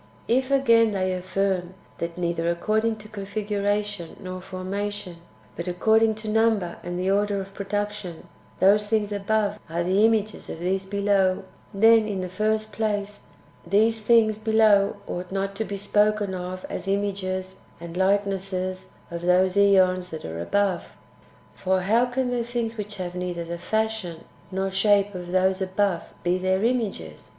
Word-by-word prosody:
7. 235 - +3
If, 260 0 -6
again, 230 -5 +4
they 185 -1 0
affirm 185 0 -1 0.2
that 170 0 -4
neither 170 -1 -1
according 215 +6 +1
to 215 0 -12
configura 205 0 -1
tion 200 -5 -7
nor 185 -1 -6
formation, 195 0 -5 0.4
but 170 +2 -5
according 220 +5 +3
to 215 0 -8
number 215 -5 +1
and 175 0 -5
the 185 +1 0
order 205 0 +1
of 195 0 -7
production, 205 -3 -4 0.3
those 205 +3 +4
things 210 -1 0
[above] 205 +1 0
are 170 +1 -1
the 190 +4 +2
images 220 -1 +1
[of - - -5
these 190 +2 -1
below], 200 -2 +1 0.3
then, 220 +1 +5
in 195 -3 -2
the 185 - -4
first 215 +3 -1
place, 205 -2 -2 0.4
these 220 +5 +2
things 215 -1 +4
[below] 215 -2 +4
ought 180 +1 -5
not 195 0 -2
to 220 - -1
be 200 - -4
spoken 205 0 +1
of 185 0 -5
as - - -6
images 190 -1 -2 0.2
and 170 0 -8
likenesses 190 -1 0 0.2
of 170 0 -5
those 180 +1 +3
^ons 185 -2 +4
that 160 -2 -7
are 80 +1 -5
above. 195 - -1 0.6
For 190 0 0
how 225 +6 +3
can 250 0 -1
the 240 -1 0
things 235 -1 -3
which 210 -1 -6
have 180 -2 -4
neither 180 -1 -3
the 170 0 -5
fashion 220 -4 -2 0.3
nor 190 +1 -1
shape 205 +1 +3
of 175 -1 -7
those 185 +1 +2
[above] 190 -2 0 0.2
be 180 +1 +1
their 185 +2 +1
images 210 - -2
200 Hz, 160 wpm, -25 LUFS, 185-215 Hz, 0.6 s, then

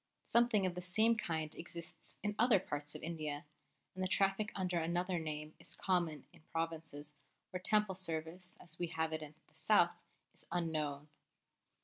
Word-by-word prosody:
Something 235 -4 +4
of 185 - +1
the 180 - -4
same 220 +6 +4
kind 160 -7 -2
exists 170 -1 -6
in 210 0 +1
other 240 -2 +7
parts 145 -4 -4
of - - -7
India, 155 -3 -3 0.5
and 185 - -2
the - - +3
traffic 195 +3 +2
under 180 -2 0
another 175 +2 0
name 155 -1 -4
is - - -7
common 170 -6 0
in 170 - -18
provinces 160 -3 -3 0.4
where 185 - -2
Temple 210 0 +3
service 180 0 -3
as 165 0 -10
we 175 - 0
have 160 -1 -1
it 155 - -1
in 150 0 -8
the - - -29
South - - +4 0.4
is - - -15
unknown. 155 -4 -1
170 Hz, 165 wpm, -37 LUFS, 155-185 Hz, 0.5 s, other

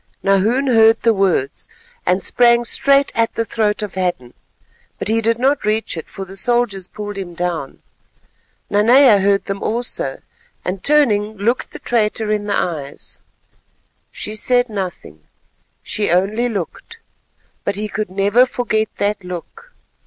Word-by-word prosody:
Nahoon 210 +8 +2
heard 225 -3 +5
the 230 - +3
words, 185 -8 -1 0.4
and 185 +1 +2
sprang 240 -1 +3
straight 275 +3 +3
at 230 0 0
the 230 - -1
throat 215 -2 -1
of 205 - -5
Hadden; 175 -10 -3 0.6
but - - -4
he 225 +1 +2
did 230 +1 +1
not 270 +4 +1
reach 215 -1 -1
it, 160 - -7
for 195 - -8
the 190 +1 -11
soldiers 230 -4 0
pulled 205 -1 -7
him 175 -3 -7
down. 170 -6 -4 0.9
Nanea 225 +2 +6
heard 200 0 +2
them 195 0 -4
also, 235 +3 -3 0.4
and 185 +1 -4
turning, 220 -8 +2
looked 230 +6 -1
the - - -9
traitor 220 -2 -1
in 210 -1 -1
the 205 - 0
eyes; 150 -5 -4 0.9
she 210 - -5
said 245 +3 +2
nothing, 185 - -6 0.6
she 210 - -2
only 205 +8 +1
looked, 210 - -6 0.7
but - - -2
he 210 +1 -3
could 210 0 -4
never 200 +6 +3
forget 220 -3 -1
that 205 -1 -1
look. 180 - -9
210 Hz, 145 wpm, -18 LUFS, 195-235 Hz, 0.9 s, Nanea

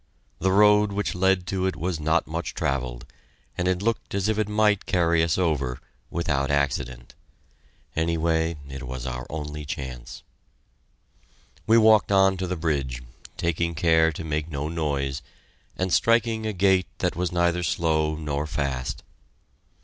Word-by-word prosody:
The 95 +2 +1
road 105 +1 +5
which 105 +1 -2
led 95 0 +2
to 95 -1 0
it 95 - -2
was 85 +1 -2
not 80 +2 +1
much 80 0 -4
travelled, 65 -3 -2 0.5
and 90 - -1
it 95 +1 0
looked 115 -2 -1
as 100 0 0
if 110 -1 0
it 105 -1 0
might 105 -1 +2
carry 85 -2 +2
us 80 -1 +1
over 75 -8 0 0.3
without 75 -5 -1
accident. 65 -4 -1 0.8
Anyway, 80 0 0
it 70 0 -7
was 65 0 -5
our 60 -1 -5
only 75 -1 -5
chance. 65 -4 -7 1.4
We 115 - +6
walked 110 -2 +5
on 95 -1 +5
to 95 0 -3
the 90 0 -3
bridge, 70 -7 -2 0.3
taking 85 0 -1
care 80 0 +4
to 80 - -6
make 75 0 -2
no 75 0 -3
noise, 70 -4 -2 0.6
and 95 -1 -1
striking 115 -1 +2
a 110 - -2
gait 95 -1 +3
that - - -1
was 90 0 -1
neither 85 0 +1
slow 80 -5 +1
nor 75 -1 -3
fast. 70 -5 -3
85 Hz, 150 wpm, -25 LUFS, 70-95 Hz, 1.4 s, We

